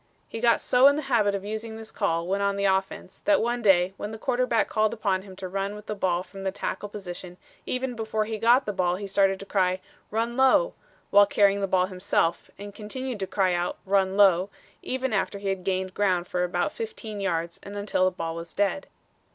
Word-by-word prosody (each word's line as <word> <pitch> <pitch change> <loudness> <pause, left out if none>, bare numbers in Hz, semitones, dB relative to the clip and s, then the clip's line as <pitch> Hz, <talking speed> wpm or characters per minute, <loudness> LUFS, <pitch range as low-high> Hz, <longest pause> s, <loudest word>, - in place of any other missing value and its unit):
He 225 - -6
got 235 0 +3
so 255 +2 +5
in 285 - +5
the 300 - -3
habit 220 -7 +2
of 195 0 -5
using 220 +1 -5
this 220 0 -9
call 170 -5 0
when 195 +3 -1
on 200 0 +1
the 200 0 -1
offense 190 -1 -1
that 305 -1 +4
one 240 +1 -1
day 190 -3 +4
when 205 - -5
the 220 - -7
quarterback 250 0 +1
called 215 +1 +1
upon 195 -4 0
him 190 -1 -12
to 185 0 -6
run 195 +2 -3
with 210 0 -10
the 215 - -3
ball 180 -3 0
from 195 +1 -11
the 190 0 -1
tackle 205 +1 -4
position 180 -3 -8 0.3
even 255 0 -2
before 220 -1 -1
he 220 0 -4
got 240 +4 +4
the 210 - -2
ball 180 -2 +1
he 200 +2 -6
started 195 -1 +2
to - - -7
cry, 185 -2 +1 0.3
'Run 230 +2 -1
low,' 265 - +4 0.4
while 205 0 +7
carrying 200 0 +3
the 195 - 0
ball 185 -1 +3
himself, 185 -3 -1
and 205 0 -9
continued 245 +3 -5
to 190 - -2
cry 185 -2 +1
out, 175 0 -1
'Run 195 0 +2
low,' 190 -2 +5 0.3
even 260 -2 -2
after 200 0 0
he 200 0 -3
had 190 -1 -2
gained 185 0 -1
ground 185 -4 +1
for 180 0 -1
about 175 +8 0
fifteen 345 - -6
yards 170 -3 -2
and 200 0 -8
until 200 -2 +1
the - - +4
ball 165 0 -3
was 170 0 -8
dead. 205 +8 0
200 Hz, 225 wpm, -26 LUFS, 185-220 Hz, 0.4 s, while